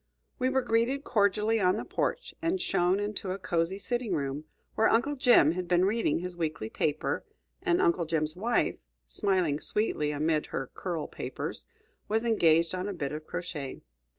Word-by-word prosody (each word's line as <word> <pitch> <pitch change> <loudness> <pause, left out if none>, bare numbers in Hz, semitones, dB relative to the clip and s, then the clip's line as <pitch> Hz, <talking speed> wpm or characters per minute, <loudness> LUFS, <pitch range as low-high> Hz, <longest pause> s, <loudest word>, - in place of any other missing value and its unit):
We 255 0 +2
were 265 0 +1
greeted 235 +5 +1
cordially 210 +1 +2
on 185 -1 +3
the - - -4
porch, - - -2
and 340 +3 0
shown 180 - +1
into 205 -2 -3
a - - -4
cosey 170 0 0
sitting 240 -2 -2
room, 140 0 -3 0.3
where 220 - +3
Uncle 280 +6 +2
Jim 245 - +5
had 180 +1 -3
been 180 +1 +3
reading 210 -5 +1
his 180 +1 -5
weekly 155 -10 -3
paper, 150 0 -1 0.4
and 360 -2 +2
Uncle 345 - +2
Jim's 155 0 +2
wife, 230 +6 +1 0.3
smiling 185 -8 +1
sweetly 185 -8 0
amid 150 +1 0
her 135 - -4
curl 170 -5 -3
papers, - - -6 0.4
was 220 +2 0
engaged 165 -7 +3
on 185 +1 -2
a - - -3
bit 145 -6 -3
of 155 +1 -6
crochet. 150 -7 -5
185 Hz, 170 wpm, -29 LUFS, 160-225 Hz, 0.4 s, Jim